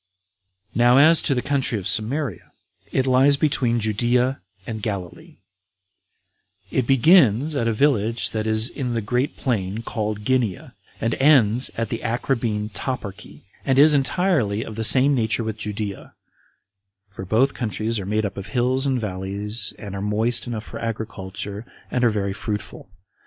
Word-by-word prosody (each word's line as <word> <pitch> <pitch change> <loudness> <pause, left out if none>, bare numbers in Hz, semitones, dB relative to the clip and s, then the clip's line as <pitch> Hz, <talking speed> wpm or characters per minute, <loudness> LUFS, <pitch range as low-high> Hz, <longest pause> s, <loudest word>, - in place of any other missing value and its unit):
4. - - -3
Now 120 +1 +5
as 160 +3 +6
to 135 - +1
the 125 - -2
country 135 -5 0
of 100 -1 -4
Samaria, 115 - -1 0.4
it 130 - +1
lies 135 +2 +4
between 130 -6 +1
Judea 120 +3 0 0.2
and 110 -2 -6
Galilee; 100 -5 -6 1.3
it 130 -3 0
begins 140 - +4
at 115 -4 0
a - - +2
village 115 -2 +1
that 110 0 -3
is 110 +1 +3
in 125 -4 -4
the 115 - -1
great 125 +6 -2
plain 110 -4 -2
called 105 -2 -4
Ginea, 125 -8 -1 0.3
and 115 +1 -1
ends 130 -4 +4
at 115 0 -2
the 115 - -3
Acrabbene 115 -3 -2
toparchy, 105 -3 -6 0.2
and 135 -1 +1
is 150 +2 +7
entirely 140 - +1
of 110 - -8
the 115 - -3
same 135 +5 +6
nature 115 -2 0
with 110 -1 -5
Judea; 105 -1 -5 0.9
for 95 -1 -9
both 115 +8 +2
countries 110 -1 -2
are 95 - -6
made 105 +1 0
up 100 - -5
of 100 0 -6
hills 130 +4 +1
and 130 -2 0
valleys, 100 +1 -4
and 100 -2 -8
are 100 - -4
moist 110 +4 0
enough 115 -3 -4
for - - -9
agriculture, 105 -2 -5 0.3
and 125 - 0
are 120 - +5
very 100 -3 -2
fruitful. 105 -2 -6
115 Hz, 160 wpm, -22 LUFS, 105-130 Hz, 1.3 s, is